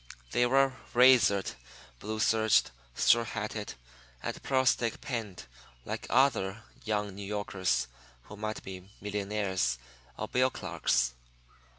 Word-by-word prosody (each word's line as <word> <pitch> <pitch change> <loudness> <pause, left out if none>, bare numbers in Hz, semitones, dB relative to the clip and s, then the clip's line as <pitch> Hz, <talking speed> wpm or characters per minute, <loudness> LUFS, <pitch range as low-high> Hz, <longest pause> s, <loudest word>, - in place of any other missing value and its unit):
They 120 - +3
were 135 +1 +4 0.2
razored, 120 -6 +5 0.5
blue 110 +1 -4
serged, 110 - +3 0.2
straw 120 0 +4
hatted, 105 -2 -5 0.5
and - - -4
pearl 130 -1 +1
stick 120 -3 +2
pinned 105 - -5 0.4
like - - -5
other 110 -5 +2 0.2
young 105 -2 -1
New 100 +1 -8
Yorkers 100 -7 -1 0.4
who 105 - -11
might 110 +1 -4
be 95 0 -9
millionaires 100 -8 -1 0.4
or - - -3
bill 130 +1 +2
clerks. 60 - 0
105 Hz, 115 wpm, -30 LUFS, 100-120 Hz, 0.5 s, razored